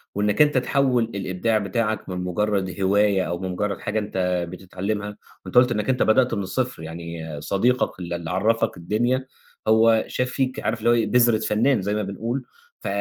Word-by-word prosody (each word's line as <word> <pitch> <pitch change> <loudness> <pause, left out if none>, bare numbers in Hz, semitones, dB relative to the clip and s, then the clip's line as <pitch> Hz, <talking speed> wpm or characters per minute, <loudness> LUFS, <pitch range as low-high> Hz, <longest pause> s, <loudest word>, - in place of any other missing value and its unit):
وإنَّك 105 +5 +1
أنت 150 -2 +4
تحوّل 130 -1 +2
الإبداع 100 +3 0
بتاعَك 110 +2 -2
من 90 - -4
مجرد 95 0 -1
هواية 100 0 +3
أو 85 +1 -3
من 95 0 -4
مجرد 100 +2 -2
حاجة 110 - -1
أنت 90 -4 -1
بتتعلمها، 100 +3 -4 0.3
وأنت - - -9
قُلت 125 0 +6
إنَّك 105 +2 -1
أنت 130 -1 +2
بدأت 125 +3 +3
من 100 - -1
الصفر 125 0 -3
يعني 80 -2 -7
صديقَك 115 +5 0
ال 85 -1 -5
اللي 85 -1 -4
عرّفك 110 +6 +1
الدنيا 120 +9 0 0.4
هو 110 0 +5
شاف 125 0 -1
فيك 130 0 -1
عارف 115 +1 -2
اللي 115 - +2 0.2
هو - - -5
بذرة 120 -2 +4
فنان 110 +2 +2
زَي 100 +2 -1
ما 105 - -1
بنقول، 115 +7 -3 0.4
ف - - -5
105 Hz, 180 wpm, -23 LUFS, 95-120 Hz, 0.4 s, قُلت